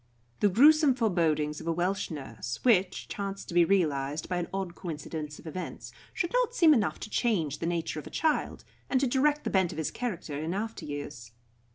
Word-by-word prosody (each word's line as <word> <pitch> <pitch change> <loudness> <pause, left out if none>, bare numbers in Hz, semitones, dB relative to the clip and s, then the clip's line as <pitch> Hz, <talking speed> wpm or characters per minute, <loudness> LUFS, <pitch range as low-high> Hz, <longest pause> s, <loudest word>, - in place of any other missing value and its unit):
The 205 - +4
gruesome 290 - +6
forebodings 160 - +1
of - - -8
a - - +2
Welsh 180 +4 -1
nurse, 135 -6 -6
which 195 -7 +2
chanced 195 -1 -5
to - - -6
be 175 0 +6
realised 155 -5 +1
by 180 - -1
an 175 - -2
odd 190 -2 -3
coincidence 155 -3 -6
of - - -15
events, 180 +3 -6 0.2
should 345 - -2
not - - +1
seem 330 -7 +7
enough 220 -7 +1
to - - -6
change 170 - 0
the 165 - -2
nature 165 -2 -2
of - - -9
a - - -7
child, 315 -1 0 0.3
and 260 - +3
to 275 - +2
direct 290 +4 +2
the - - -2
bent 190 -3 +2
of - - -8
his 160 - -1
character 185 -11 -4
in 165 +4 -2
after 220 +2 -4
years. 145 -6 -7
180 Hz, 205 wpm, -29 LUFS, 155-235 Hz, 0.3 s, seem